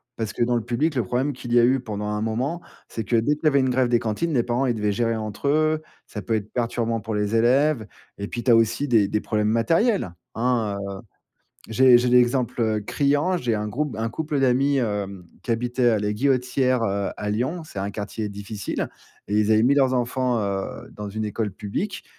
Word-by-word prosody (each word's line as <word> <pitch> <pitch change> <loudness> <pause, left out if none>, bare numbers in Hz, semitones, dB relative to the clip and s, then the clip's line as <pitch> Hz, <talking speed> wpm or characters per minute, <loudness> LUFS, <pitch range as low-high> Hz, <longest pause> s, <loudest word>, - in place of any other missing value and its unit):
parce 110 -2 -3
que 120 - 0
dans 120 0 +1
le 115 - 0
public, 140 +6 0
le 120 - +1
problème 130 +8 -1
qu'il 120 -1 -6
y 120 - +6
a - - +5
eu 130 +1 +3
pendant 105 -4 -5
un 105 0 -2
moment, 130 +10 -2 0.3
c'est 115 - -5
que 115 - -1
dès 140 +7 +2
qu'il 155 - -10
y - - +6
avait 140 -2 +4
une 130 -1 +2
grève 125 0 +2
des 120 - +4
cantines, 115 +10 -2
les 120 -4 +2
parents, 120 +3 0
ils 120 - +1
devaient 105 -1 0
gérer 115 +2 0
entre 110 +4 -4
eux. 155 +1 +2 0.3
Ça 105 - -6
peut 115 - -1
être 105 -1 -4
perturbant 115 -1 -1
pour 110 +1 -4
les 105 +2 0
élèves. 125 0 +3 0.3
Et 100 - -3
puis, 120 - -5
tu 125 - +3
as - - +7
aussi 115 +5 +2
des 110 -6 +4
des 105 +1 -1
problèmes 105 -1 0
matériels, 165 - +1 0.2
hein, 115 -4 0
heu. 100 0 -6 0.7
J'ai 125 +2 +6
j'ai 125 - +1
l'exemple, 125 0 +3
heu, 110 -2 +1
criant. 145 - +1
J'ai 120 -7 0
un 105 0 -2
groupe 135 +2 -3
un 115 +1 -1
couple 155 0 -2
d'amis, 135 +2 +3
hem, 100 -6 -3 0.2
qui - - -5
habitait 120 +2 +1
à 110 -3 +3
la 105 0 -1
Guillotière, 125 +1 +1
heu, 100 -1 -1
à 105 - -3
Lyon. 130 +11 -2
C'est 130 - -9
un 100 +1 -2
quartier 105 +1 -4
difficile 100 0 -4 0.4
et 105 - -1
ils 105 0 +2
avaient 110 0 +5
mis 135 +3 +4
leurs 135 -2 +3
enfants, 125 0 0
heu, 100 -1 -4
dans 105 -1 -7
une 110 +2 -3
école 105 0 -2
publique 105 - -4
120 Hz, 225 wpm, -24 LUFS, 105-130 Hz, 0.7 s, as